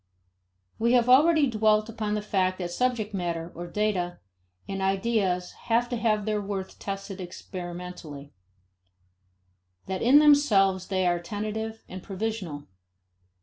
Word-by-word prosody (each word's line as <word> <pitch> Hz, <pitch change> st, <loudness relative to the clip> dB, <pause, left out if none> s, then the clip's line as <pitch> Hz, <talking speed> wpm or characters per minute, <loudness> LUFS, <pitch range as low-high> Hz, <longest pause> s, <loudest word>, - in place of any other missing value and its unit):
We 235 Hz, +2 st, +3 dB
have 245 Hz, -1 st, +4 dB
already 300 Hz, +4 st, +6 dB
dwelt 215 Hz, -3 st, +2 dB
upon 215 Hz, -2 st, -3 dB
the 210 Hz, -, -2 dB
fact 185 Hz, -3 st, 0 dB
that 175 Hz, -2 st, -4 dB
subject 230 Hz, 0 st, -1 dB
matter, 170 Hz, -3 st, -3 dB
or 175 Hz, +1 st, -7 dB
data, 180 Hz, -2 st, -1 dB, 0.5 s
and 195 Hz, 0 st, -4 dB
ideas 190 Hz, -2 st, 0 dB, 0.2 s
have 235 Hz, +1 st, +2 dB
to 245 Hz, -, -2 dB
have 215 Hz, -3 st, +1 dB
their 215 Hz, -1 st, 0 dB
worth 195 Hz, -1 st, -5 dB
tested 195 Hz, -1 st, -5 dB
experimentally: 175 Hz, -5 st, -8 dB, 1.5 s
that 190 Hz, -1 st, -3 dB
in 255 Hz, +5 st, +6 dB
themselves 215 Hz, -11 st, +4 dB
they 185 Hz, -1 st, 0 dB
are 175 Hz, -1 st, +2 dB
tentative 215 Hz, +4 st, -5 dB
and 185 Hz, 0 st, -8 dB
provisional. 195 Hz, -7 st, -4 dB
200 Hz, 130 wpm, -27 LUFS, 180-225 Hz, 1.5 s, already